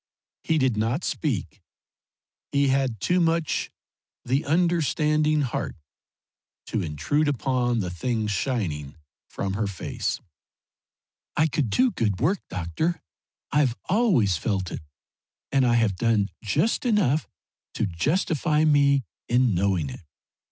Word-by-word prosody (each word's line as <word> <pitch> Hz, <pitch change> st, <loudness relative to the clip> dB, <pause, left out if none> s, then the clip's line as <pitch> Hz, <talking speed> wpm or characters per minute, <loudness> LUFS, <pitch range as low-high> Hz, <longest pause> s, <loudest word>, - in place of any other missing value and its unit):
He 160 Hz, -, +1 dB
did 130 Hz, -6 st, +2 dB
not 115 Hz, +10 st, 0 dB
speak; 135 Hz, -, -2 dB, 0.9 s
he 140 Hz, -1 st, +3 dB
had 130 Hz, -5 st, +1 dB
too 180 Hz, -, +2 dB
much 165 Hz, -2 st, +1 dB, 0.6 s
the 135 Hz, +5 st, +1 dB
understanding 155 Hz, -2 st, +2 dB
heart 130 Hz, -4 st, -2 dB, 0.9 s
to 110 Hz, -, -2 dB
intrude 85 Hz, -, 0 dB
upon 125 Hz, -4 st, 0 dB
the 90 Hz, -2 st, -3 dB
things 110 Hz, +4 st, -1 dB
shining 90 Hz, -, -2 dB, 0.3 s
from 95 Hz, -1 st, -3 dB
her 105 Hz, +1 st, -1 dB
face. 100 Hz, -3 st, -3 dB, 1.2 s
"I 155 Hz, -, +5 dB
could 150 Hz, -5 st, 0 dB
do 255 Hz, -, +3 dB
good 105 Hz, -, -1 dB
work, 175 Hz, +9 st, +2 dB
doctor. 90 Hz, -, -2 dB, 0.5 s
I've 140 Hz, -5 st, +2 dB
always 180 Hz, -, +3 dB
felt 95 Hz, -1 st, -2 dB
it, -, -, -5 dB, 0.7 s
and 135 Hz, -2 st, +3 dB
I 120 Hz, -, +3 dB
have 110 Hz, -5 st, +2 dB
done 110 Hz, -3 st, +2 dB
just 110 Hz, -, +1 dB
enough 200 Hz, -, +2 dB, 0.5 s
to 110 Hz, -, +1 dB
justify 150 Hz, -, +1 dB
me 140 Hz, -2 st, +4 dB, 0.3 s
in 125 Hz, -2 st, +3 dB
knowing 90 Hz, -6 st, 0 dB
it. -, -, -9 dB
130 Hz, 125 wpm, -25 LUFS, 105-155 Hz, 1.2 s, I